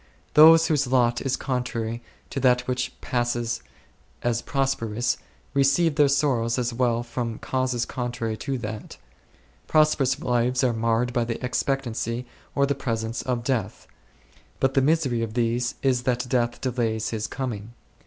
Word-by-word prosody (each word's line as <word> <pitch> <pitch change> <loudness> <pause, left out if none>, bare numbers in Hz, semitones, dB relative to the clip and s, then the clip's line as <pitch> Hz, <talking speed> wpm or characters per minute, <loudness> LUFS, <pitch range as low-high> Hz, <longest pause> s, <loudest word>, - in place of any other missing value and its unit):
Those 160 +2 +8
whose 145 -4 +1
lot 120 -2 +2
is 135 -1 -1
contrary 120 -3 -3 0.3
to 140 - -2
that 125 -1 +4
which 125 0 -2
passes 120 -1 -1 0.6
as 120 -1 +1
prosperous 125 -3 -1 0.4
receive 140 +4 +3
their 145 -1 +4
sorrows 135 -5 +1
as 120 -1 -1
well 120 -1 +1
from 120 -1 -4
causes 130 -2 -1
contrary 120 -3 -3
to 135 +4 -3
that. 110 -2 -7 0.7
Prosperous 150 -4 +3
lives 125 +1 +1
are 125 -2 +3
marred 115 +2 0
by 120 -2 +2
the 115 0 -3
ex 125 - 0
pectancy, 125 -3 -2 0.3
or 140 - +4
the 140 - +1
presence, 115 -4 -3
of 125 -2 -2
death; 115 -6 -2 0.7
but 135 0 +2
the 135 - +3
misery 135 -5 +2
of 115 -1 -4
these 120 +1 0
is 130 -2 +2
that 125 0 -1
death 120 -1 0
delays 115 -4 -1
his 110 -1 -3
coming. 120 -4 -5
125 Hz, 150 wpm, -25 LUFS, 115-135 Hz, 0.7 s, Those